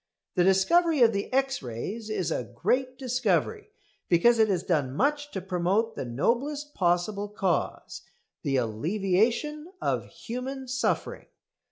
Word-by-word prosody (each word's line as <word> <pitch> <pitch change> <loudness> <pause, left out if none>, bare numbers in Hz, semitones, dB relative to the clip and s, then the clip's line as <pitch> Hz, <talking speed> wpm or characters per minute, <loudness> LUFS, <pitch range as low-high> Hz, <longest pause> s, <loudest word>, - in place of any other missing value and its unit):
The 180 - +3
discovery 270 - +4
of 230 -1 +5
the 200 0 -3
X 270 0 +1
rays 165 - -5
is 190 -5 -1
a 120 -1 -3
great 255 - 0
discovery, 265 - 0 0.4
because 225 +7 +5
it 220 - +5
has 185 -4 0
done 145 -8 0
much 290 - +1
to 190 - -5
promote 190 +5 0
the - - -4
noblest 275 - -1
possible 190 +3 0
cause, 195 -4 -2 0.4
the 135 - -1
alleviation 200 - 0
of - - -1
human 260 +3 -6
suffering. 255 +1 -1
215 Hz, 135 wpm, -27 LUFS, 180-265 Hz, 0.4 s, of